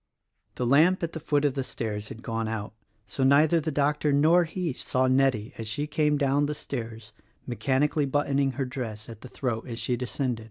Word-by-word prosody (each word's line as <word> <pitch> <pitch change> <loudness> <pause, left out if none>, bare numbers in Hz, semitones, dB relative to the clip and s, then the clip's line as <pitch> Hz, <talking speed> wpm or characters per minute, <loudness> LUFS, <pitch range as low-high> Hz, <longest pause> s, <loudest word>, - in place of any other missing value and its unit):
The 125 - -2
lamp 160 +9 +4
at 170 - -2
the 160 - -5
foot 145 -1 +1
of 140 - +2
the 135 - -2
stairs 105 -4 -4
had 115 - -10
gone 115 -1 -2
out; 110 -1 -4 0.3
so 135 - -3
neither 150 +5 +5
the 155 - -2
doctor 145 +1 +1
nor 160 +5 +4
he 165 -2 -3
saw 130 +1 0
Nettie 130 -3 +2
as 110 - -4
she 130 +7 -2
came 150 0 +1
down 140 0 +2
the 150 - -3
stairs 115 -6 -6 0.2
— - - -39
mechanically 140 +4 0
buttoning 140 -1 +1
her 135 +1 -2
dress 115 -5 -6
at 115 -2 -10
the 130 - -10
throat 120 -4 -3
as 115 -2 -5
she 125 - -1
descended. 125 -1 -2
135 Hz, 205 wpm, -27 LUFS, 115-145 Hz, 0.3 s, neither